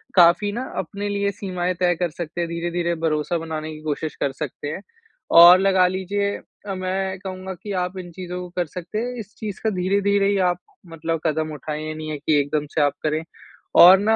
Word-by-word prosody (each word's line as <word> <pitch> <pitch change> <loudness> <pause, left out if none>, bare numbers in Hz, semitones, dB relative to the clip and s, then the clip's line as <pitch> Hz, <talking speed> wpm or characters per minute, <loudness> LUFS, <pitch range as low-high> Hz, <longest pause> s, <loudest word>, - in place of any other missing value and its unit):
काफ़ी 180 +3 +5
ना 235 +5 -3
अपने 200 +4 -3
लिए 200 0 0
सीमाएँ 185 -2 -2
तय 175 -1 +3
कर 175 0 -1
सकते 170 +1 -5
हैं 170 - -1
धीरे-धीरे 170 0 -1
भरोसा 160 +1 0
बनाने 160 -1 -4
की 155 - -10
कोशिश 155 0 -3
कर 140 - -1
सकते 145 +1 -6
हैं। 160 - -5 0.5
और 175 +2 +10
लगा 190 -2 +4
लीजिए 200 +2 -1 0.3
अ, 195 - -3
मैं 190 0 -2
कहूँगा 190 0 -6
कि 205 - -5
आप 180 +1 -5
इन 175 -2 -7
चीज़ों 180 0 -6
को 180 - -7
कर 175 - +2
सकते 180 +5 -7
हैं 245 +2 -3
इस 210 0 -9
चीज़ 210 -4 -5
का 220 - +2
धीरे-धीरे 200 +1 +2
ही 200 - +2
आप 175 - -1 0.3
मतलब 165 0 -3
कदम 155 0 0
उठाएँ 150 +1 -5
ये 155 - -3
नहीं 155 0 -6
है 150 - -3
कि 150 +1 +2
एकदम 145 +1 -1
से - - +3
आप 145 -1 +3
करें। 155 +1 0 0.6
और 185 +2 +10
ना 220 +2 +3
175 Hz, 210 wpm, -23 LUFS, 160-195 Hz, 0.6 s, और